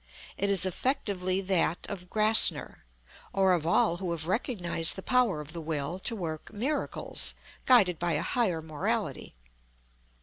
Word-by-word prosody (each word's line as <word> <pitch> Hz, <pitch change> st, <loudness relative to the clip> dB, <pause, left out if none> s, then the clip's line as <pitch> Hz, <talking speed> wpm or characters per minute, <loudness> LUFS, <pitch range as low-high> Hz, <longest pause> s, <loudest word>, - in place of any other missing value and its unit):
It 200 Hz, -, -1 dB
is 195 Hz, -2 st, +3 dB
effectively 190 Hz, -3 st, -1 dB
that 185 Hz, -3 st, 0 dB
of 180 Hz, -3 st, -8 dB
GRASSNER, 215 Hz, -, +3 dB, 0.5 s
or 190 Hz, -1 st, +3 dB
of 165 Hz, -3 st, -1 dB
all 170 Hz, 0 st, +2 dB
who 180 Hz, 0 st, -5 dB
have 160 Hz, -2 st, -4 dB
recognized 180 Hz, -, 0 dB
the 190 Hz, -, -8 dB
power 250 Hz, -10 st, +1 dB
of 150 Hz, +1 st, -10 dB
the 170 Hz, -, -6 dB
Will 155 Hz, +2 st, -3 dB
to 230 Hz, -, 0 dB
work 160 Hz, -6 st, -6 dB
"miracles," 265 Hz, +9 st, -1 dB, 0.3 s
guided 200 Hz, -10 st, +5 dB
by 175 Hz, -1 st, -1 dB
a 150 Hz, -, -1 dB
higher 185 Hz, -11 st, -1 dB
morality. 155 Hz, -, -3 dB
185 Hz, 145 wpm, -28 LUFS, 165-205 Hz, 0.5 s, guided